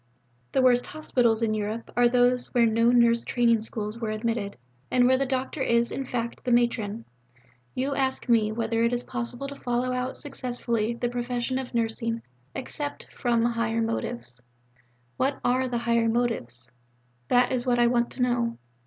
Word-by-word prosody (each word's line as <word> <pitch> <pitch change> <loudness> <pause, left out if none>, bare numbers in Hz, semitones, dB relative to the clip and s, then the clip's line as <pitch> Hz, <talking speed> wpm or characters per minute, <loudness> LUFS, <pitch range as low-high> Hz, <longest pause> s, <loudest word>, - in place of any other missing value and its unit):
The 265 - +3
worst 245 -1 +4
hospitals 240 -7 +1
in 220 -1 +1
Europe 215 +2 -3
are 245 0 +5
those 245 0 +3
where 240 -1 +5
no 230 +1 +3
nurse 235 -1 +4
training 235 -2 +2
schools 215 +1 -4
are 225 - -1
admitted, 215 -2 -2 0.3
where 250 +1 +4
the 270 +1 0
doctor 265 +2 -2
is, 235 -2 +2
in 270 - -3
fact, 235 -2 -4
the 250 - -1
matron. 230 -2 +1 0.7
You 270 +2 0
ask 265 -1 -1
me 225 -3 +3
whether 225 0 0
it 235 +1 +2
is 245 0 -1
possible 250 +2 -4
to 280 0 -9
follow 245 +1 -1
out 250 +1 -2
successfully 240 -4 -2
the 240 - -1
profession 245 +1 -2
of 255 -2 -7
Nursing 230 0 -1 0.3
except 290 +2 -5
from 235 -3 +1
'higher 230 -1 0
motives.' 225 - -4 0.8
What 270 +2 0
are 255 +1 +2
the 245 -1 -1
'higher 235 -1 +2
motives'? 130 - -2 0.6
That 245 0 +3
is 255 0 -1
what 245 -1 +3
I 240 - +5
want 235 0 +2
to 250 - -1
know. 240 -1 0
240 Hz, 170 wpm, -26 LUFS, 230-250 Hz, 0.8 s, are